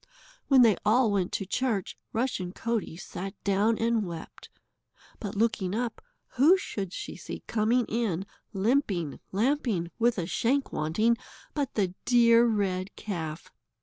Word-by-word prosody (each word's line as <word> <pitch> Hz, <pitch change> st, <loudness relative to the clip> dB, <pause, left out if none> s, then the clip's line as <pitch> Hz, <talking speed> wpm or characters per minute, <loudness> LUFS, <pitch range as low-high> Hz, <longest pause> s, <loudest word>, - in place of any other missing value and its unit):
When 265 Hz, -3 st, +7 dB
they 220 Hz, -4 st, +5 dB
all 220 Hz, +2 st, +4 dB
went 190 Hz, -3 st, 0 dB
to 195 Hz, -, -1 dB
church, 215 Hz, -1 st, -1 dB, 0.2 s
Rushen 220 Hz, -7 st, -2 dB
Coatie 225 Hz, -7 st, -2 dB
sat 195 Hz, +1 st, -6 dB
down 205 Hz, +3 st, +2 dB
and 230 Hz, -1 st, +1 dB
wept, 170 Hz, -4 st, -8 dB, 0.7 s
but 205 Hz, -2 st, -5 dB
looking 205 Hz, -3 st, +1 dB
up, 235 Hz, 0 st, -2 dB, 0.4 s
who 315 Hz, +9 st, +7 dB
should 195 Hz, -, -4 dB
she -, -, -6 dB
see -, -, -8 dB
coming 230 Hz, +2 st, +2 dB
in 210 Hz, -6 st, -1 dB, 0.3 s
limping, 195 Hz, -, 0 dB
lamping, 215 Hz, -, 0 dB
with 235 Hz, 0 st, +3 dB
a 175 Hz, -, -1 dB
shank 265 Hz, +10 st, 0 dB
wanting, 215 Hz, +10 st, +2 dB, 0.4 s
but 285 Hz, -3 st, -2 dB
the 190 Hz, -4 st, +1 dB
dear 235 Hz, -1 st, +6 dB
red 195 Hz, -3 st, -1 dB
calf? 165 Hz, -6 st, -5 dB
215 Hz, 140 wpm, -28 LUFS, 190-235 Hz, 0.7 s, When